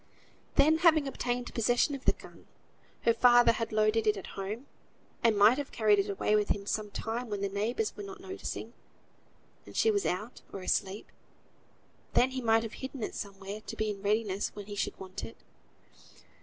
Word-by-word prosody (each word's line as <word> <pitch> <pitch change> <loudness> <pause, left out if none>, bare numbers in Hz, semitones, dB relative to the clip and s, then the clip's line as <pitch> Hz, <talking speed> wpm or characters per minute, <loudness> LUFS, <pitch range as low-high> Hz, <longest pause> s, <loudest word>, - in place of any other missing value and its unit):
Then 315 +2 +5
having 315 -4 +5
obtained 245 -2 -3
possession 245 +5 +2
of 275 -1 -6
the - - +5
gun, - - -15 0.5
her 230 - +4
father 240 0 +6
had 230 0 -3
loaded 215 +1 +2
it 210 -1 +3
at 195 - -7
home, 205 +6 -5 0.6
and 225 -3 +4
might 215 +7 +6
have 285 - -5
carried 210 -3 +3
it 195 - 0
away 200 +2 +1
with 210 -1 +1
him 200 0 0
some 210 0 -2
time 230 +4 -4
when 205 -1 -3
the 200 - +1
neighbours 220 - -1
were - - -7
not 400 0 -8
noticing, 385 +1 -6 0.9
and - - -10
she 445 - +4
was 405 -2 +1
out, 210 +7 -3
or 195 - -6
asleep; 190 +2 -1
and - - -5
then 260 - 0
he 260 0 -3
might 225 -1 +3
have 225 - -6
hidden 265 -2 -5
it - - -3
somewhere 200 +1 -6
to - - -7
be 215 -1 -1
in 200 -1 -8
readiness 205 -1 0
when 205 -1 -7
he 205 0 -7
should - - -2
want 185 -1 -7
it. 115 - -8
220 Hz, 195 wpm, -30 LUFS, 205-250 Hz, 0.9 s, father